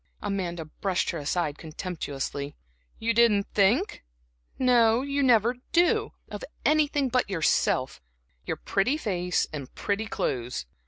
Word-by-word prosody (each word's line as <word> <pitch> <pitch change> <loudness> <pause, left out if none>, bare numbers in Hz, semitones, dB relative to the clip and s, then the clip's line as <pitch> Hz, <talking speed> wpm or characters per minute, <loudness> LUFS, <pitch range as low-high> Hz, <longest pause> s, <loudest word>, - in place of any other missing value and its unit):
Amanda 180 -5 -3
brushed 180 +4 -1
her 170 - -4
aside 150 0 -1
contemptuously. 145 -4 -5 0.4
"You 230 +1 0
didn't 225 -4 +4
think? 220 - +2 0.5
no, 240 -1 +4
you 280 0 -1
never 240 -2 +4 0.2
do, 350 +1 +3
of - - -7 0.2
anything 295 -2 +3
but 250 -3 +1
yourself, 155 - +1 0.4
your - - -3
pretty 225 +10 +1
face 180 - 0
and 140 -4 -6
pretty 210 +2 -1
clothes! 125 - -2
200 Hz, 120 wpm, -27 LUFS, 165-245 Hz, 0.5 s, didn't